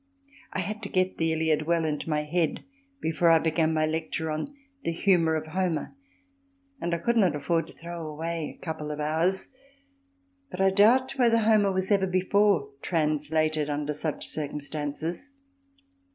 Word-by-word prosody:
I 185 Hz, -, -2 dB
had 210 Hz, +4 st, -4 dB
to 200 Hz, -, -5 dB
get 185 Hz, 0 st, 0 dB
the 165 Hz, 0 st, +2 dB
Iliad 160 Hz, -1 st, +1 dB
well 170 Hz, -1 st, +2 dB
into 150 Hz, +1 st, -2 dB
my 150 Hz, -1 st, +1 dB
head 160 Hz, +1 st, -1 dB, 0.4 s
before 165 Hz, +1 st, +2 dB
I 165 Hz, -, +7 dB
began 160 Hz, 0 st, +1 dB
my 155 Hz, -1 st, +2 dB
lecture 160 Hz, 0 st, -2 dB
on 155 Hz, -, -3 dB, 0.3 s
The -, -, 0 dB
Humour 165 Hz, -2 st, +3 dB
of 155 Hz, -, -2 dB
Homer 165 Hz, -3 st, -2 dB, 0.9 s
and 170 Hz, 0 st, 0 dB
I -, -, -1 dB
could 235 Hz, +7 st, 0 dB
not 185 Hz, -8 st, +4 dB
afford 165 Hz, +2 st, 0 dB
to -, -, -13 dB
throw 170 Hz, -1 st, -7 dB
away 160 Hz, +1 st, -4 dB
a -, -, -13 dB
couple 155 Hz, -2 st, -4 dB
of 150 Hz, 0 st, -4 dB
hours, 165 Hz, -, 0 dB, 1.0 s
but 180 Hz, -, -8 dB
I 195 Hz, 0 st, +4 dB
doubt 245 Hz, +7 st, +4 dB
whether 235 Hz, -2 st, +5 dB
Homer 215 Hz, -3 st, +4 dB
was 190 Hz, +1 st, -1 dB
ever 195 Hz, -2 st, +3 dB
before 185 Hz, -4 st, +2 dB
translated 155 Hz, -1 st, 0 dB
under 145 Hz, 0 st, -2 dB
such 150 Hz, +1 st, -3 dB
circumstances. 150 Hz, -, -4 dB
165 Hz, 165 wpm, -27 LUFS, 155-190 Hz, 1.0 s, I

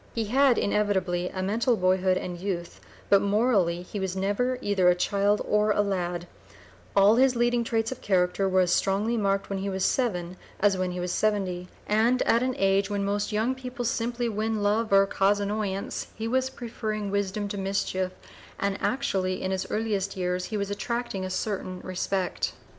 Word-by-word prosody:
He 230 Hz, -, 0 dB
had 260 Hz, +3 st, +4 dB
inevitably 190 Hz, -4 st, 0 dB
a 185 Hz, -, -4 dB
mental 225 Hz, +4 st, +1 dB
boyhood 185 Hz, 0 st, +2 dB
and 175 Hz, -1 st, -5 dB
youth, 180 Hz, -3 st, -4 dB, 0.3 s
but 200 Hz, -, +5 dB
morally 200 Hz, -5 st, +2 dB
he 205 Hz, +3 st, -6 dB
was 190 Hz, -1 st, -2 dB
never 205 Hz, +7 st, 0 dB
either 195 Hz, -3 st, +3 dB
a 180 Hz, -, +4 dB
child 200 Hz, +3 st, +1 dB
or 210 Hz, 0 st, +2 dB
a 205 Hz, -, +3 dB
lad; 175 Hz, -3 st, -2 dB, 0.7 s
all 200 Hz, +3 st, +6 dB
his 260 Hz, 0 st, +4 dB
leading 240 Hz, 0 st, +2 dB
traits 225 Hz, -1 st, -1 dB
of 260 Hz, -, -6 dB
character 185 Hz, 0 st, +1 dB
were 185 Hz, 0 st, +4 dB
as 180 Hz, -1 st, +2 dB
strongly 205 Hz, +4 st, +1 dB
marked 200 Hz, -2 st, 0 dB
when 195 Hz, -, -1 dB
he 200 Hz, +1 st, -2 dB
was 190 Hz, -1 st, -1 dB
seven 185 Hz, -8 st, -1 dB, 0.2 s
as 205 Hz, -1 st, +3 dB
when 185 Hz, 0 st, -1 dB
he 180 Hz, -, -4 dB
was 180 Hz, 0 st, -2 dB
seventy, 185 Hz, -4 st, 0 dB, 0.2 s
and 230 Hz, +4 st, +2 dB
at 230 Hz, -, +3 dB
an 255 Hz, 0 st, 0 dB
age 195 Hz, +1 st, +2 dB
when 200 Hz, -1 st, -1 dB
most 205 Hz, +2 st, -1 dB
young 220 Hz, +4 st, +1 dB
people 255 Hz, -1 st, -6 dB
simply 240 Hz, +1 st, -1 dB
win 220 Hz, -1 st, -1 dB
love 215 Hz, +2 st, +1 dB
or 195 Hz, 0 st, +6 dB
cause 195 Hz, +1 st, +2 dB
annoyance, 200 Hz, -1 st, -3 dB
he 225 Hz, +1 st, -4 dB
was 260 Hz, +2 st, +1 dB
preferring 215 Hz, -5 st, -4 dB
wisdom 200 Hz, +1 st, -1 dB
to 205 Hz, -, -5 dB
mischief, 190 Hz, -1 st, -1 dB, 0.5 s
and 200 Hz, -1 st, -1 dB
actually 190 Hz, -8 st, 0 dB
in 190 Hz, -, -1 dB
his 190 Hz, -1 st, -2 dB
earliest 205 Hz, -3 st, -1 dB
years 180 Hz, 0 st, -2 dB
was 205 Hz, -2 st, -2 dB
attracting 235 Hz, -1 st, -3 dB
a 185 Hz, -, -3 dB
certain 185 Hz, -1 st, -3 dB
respect. 185 Hz, 0 st, -2 dB
200 Hz, 180 wpm, -27 LUFS, 185-225 Hz, 0.7 s, all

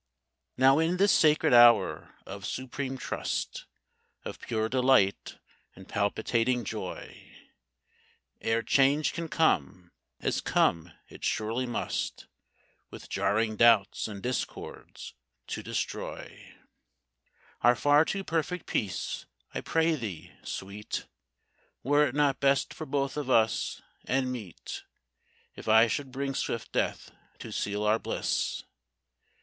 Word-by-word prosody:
Now, 135 Hz, +3 st, +5 dB
in 165 Hz, +3 st, +1 dB
this 200 Hz, +2 st, +4 dB
sacred 155 Hz, -4 st, +4 dB
hour 120 Hz, -5 st, +5 dB
of 100 Hz, 0 st, -8 dB
supreme 130 Hz, +5 st, -4 dB
trust, -, -, -4 dB, 0.6 s
Of -, -, -6 dB
pure 110 Hz, -2 st, -1 dB
delight 125 Hz, -5 st, +2 dB, 0.4 s
and 95 Hz, 0 st, -13 dB
palpitating 115 Hz, +4 st, 0 dB
joy, -, -, -7 dB, 1.1 s
Ere 115 Hz, +1 st, 0 dB
change 140 Hz, +6 st, +3 dB
can 170 Hz, -2 st, -4 dB
come, 90 Hz, -, 0 dB, 0.3 s
as -, -, -1 dB
come 85 Hz, +1 st, +1 dB, 0.2 s
it -, -, -14 dB
surely 115 Hz, +4 st, -1 dB
must, 120 Hz, -, -3 dB, 0.6 s
With -, -, -11 dB
jarring 110 Hz, +1 st, 0 dB
doubts 115 Hz, -4 st, +4 dB
and 100 Hz, -3 st, -8 dB
discords, 125 Hz, 0 st, -5 dB, 0.3 s
to -, -, -5 dB
destroy -, -, -5 dB, 1.1 s
Our 120 Hz, +1 st, +5 dB
far 145 Hz, +6 st, +5 dB
too 195 Hz, +4 st, -3 dB
perfect 165 Hz, +1 st, -2 dB
peace, 100 Hz, -4 st, -3 dB, 0.3 s
I -, -, -3 dB
pray 165 Hz, 0 st, +2 dB
thee, 110 Hz, -, -6 dB
Sweet, 100 Hz, +2 st, -5 dB, 0.8 s
Were 145 Hz, +3 st, +4 dB
it 130 Hz, -, -6 dB
not 145 Hz, -2 st, +2 dB
best 140 Hz, 0 st, +2 dB
for 155 Hz, -, -7 dB
both 140 Hz, 0 st, -1 dB
of 145 Hz, -3 st, -3 dB
us, 115 Hz, -3 st, +1 dB, 0.2 s
and 130 Hz, -1 st, 0 dB
meet, 110 Hz, -9 st, -7 dB, 0.7 s
If -, -, -11 dB
I 110 Hz, +1 st, +7 dB
should 130 Hz, +4 st, -3 dB
bring 135 Hz, +1 st, -3 dB
swift 115 Hz, -3 st, -3 dB
death -, -, -2 dB, 0.3 s
to -, -, -9 dB
seal 105 Hz, +1 st, -2 dB
our 105 Hz, +1 st, +3 dB
bliss? -, -, -2 dB
125 Hz, 120 wpm, -29 LUFS, 110-140 Hz, 1.1 s, I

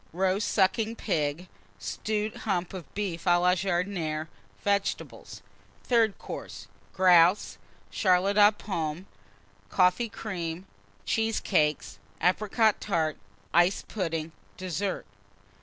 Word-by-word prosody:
Roast 190 Hz, +3 st, +1 dB
Sucking 215 Hz, +4 st, +1 dB
Pig. 160 Hz, -4 st, -2 dB, 0.3 s
Stewed 215 Hz, -, -3 dB
Hump 185 Hz, -4 st, -2 dB
of 180 Hz, -5 st, -8 dB
Beef 195 Hz, -5 st, -3 dB
à 175 Hz, -1 st, +4 dB
la 180 Hz, +1 st, +4 dB
Jardinière. 175 Hz, -4 st, -1 dB, 0.3 s
Vegetables. 200 Hz, -1 st, -2 dB, 0.4 s
THIRD 230 Hz, -4 st, +2 dB
COURSE. -, -, -8 dB, 0.2 s
Grouse. 180 Hz, +1 st, +4 dB, 0.3 s
Charlotte 190 Hz, +1 st, +2 dB
aux 205 Hz, 0 st, +8 dB
Pommes. 170 Hz, -5 st, -4 dB, 0.6 s
Coffee 185 Hz, +6 st, +2 dB
Cream. 180 Hz, -5 st, -5 dB, 0.4 s
Cheesecakes. 200 Hz, -, 0 dB, 0.2 s
Apricot 215 Hz, +4 st, +2 dB
Tart. 160 Hz, -6 st, 0 dB, 0.4 s
Iced 175 Hz, +3 st, +3 dB
Pudding. 165 Hz, -5 st, -3 dB, 0.3 s
DESSERT. 185 Hz, +2 st, -3 dB
185 Hz, 95 wpm, -28 LUFS, 170-205 Hz, 0.6 s, aux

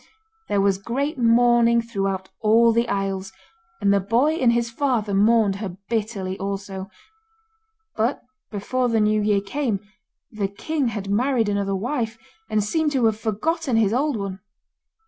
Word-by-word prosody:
There 205 Hz, -, +1 dB
was 195 Hz, -1 st, +2 dB
great 275 Hz, +8 st, -2 dB
mourning 235 Hz, 0 st, +4 dB
throughout 195 Hz, -4 st, -3 dB
all 230 Hz, +2 st, +5 dB
the 235 Hz, +1 st, +1 dB
isles, 195 Hz, -1 st, -2 dB, 0.5 s
and 200 Hz, 0 st, +3 dB
the 200 Hz, -, +3 dB
boy 235 Hz, +10 st, +2 dB
and 255 Hz, -7 st, +3 dB
his 235 Hz, 0 st, +1 dB
father 230 Hz, -6 st, 0 dB
mourned 205 Hz, 0 st, +3 dB
her 195 Hz, -3 st, -6 dB
bitterly 205 Hz, -4 st, -2 dB
also; 195 Hz, -1 st, -5 dB, 1.1 s
but 230 Hz, +5 st, 0 dB, 0.3 s
before 245 Hz, +5 st, -1 dB
the 225 Hz, -1 st, +2 dB
new 215 Hz, 0 st, +2 dB
year 205 Hz, -1 st, +2 dB
came 220 Hz, 0 st, -2 dB, 0.5 s
the 210 Hz, -2 st, -2 dB
king 275 Hz, +8 st, -2 dB
had 205 Hz, -3 st, -4 dB
married 235 Hz, 0 st, +1 dB
another 200 Hz, -1 st, 0 dB
wife, 230 Hz, +1 st, -2 dB, 0.3 s
and 215 Hz, -1 st, +1 dB
seemed 310 Hz, +8 st, 0 dB
to 255 Hz, -4 st, +2 dB
have 220 Hz, -1 st, +1 dB
forgotten 260 Hz, +6 st, -1 dB
his 220 Hz, -2 st, +3 dB
old 275 Hz, 0 st, +1 dB
one. 195 Hz, -2 st, -5 dB
220 Hz, 150 wpm, -23 LUFS, 200-240 Hz, 1.1 s, all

